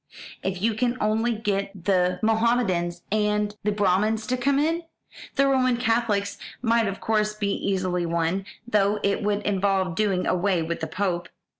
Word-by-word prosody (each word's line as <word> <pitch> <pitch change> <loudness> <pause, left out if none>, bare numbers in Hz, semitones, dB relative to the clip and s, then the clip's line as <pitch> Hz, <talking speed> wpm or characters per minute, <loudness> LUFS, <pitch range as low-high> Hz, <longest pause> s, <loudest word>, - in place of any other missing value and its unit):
If 190 0 -3
you 225 0 +3
can 240 +3 0
only 220 +3 +1
get 200 -3 -3
the 180 -2 +2
Mohamedans 220 -6 +1
and 210 0 +1
the 210 - +1
Brahmins 210 +2 +1
to 250 - 0
come 275 +2 +1
in! 325 +4 +1 0.5
The 275 - +4
Roman 255 -2 +3
Catholics 225 -4 0 0.2
might 230 -2 +3
of 195 0 -4
course 210 -1 0
be 205 -1 -1
easily 185 -3 -1
won, 170 +3 0 0.2
though 210 -2 +2
it 200 +2 +1
would 205 0 0
involve 195 -2 +1
doing 195 -1 0
away 185 -1 +1
with 170 +1 -3
the 160 - -3
Pope. 175 0 -2
205 Hz, 160 wpm, -25 LUFS, 185-225 Hz, 0.5 s, The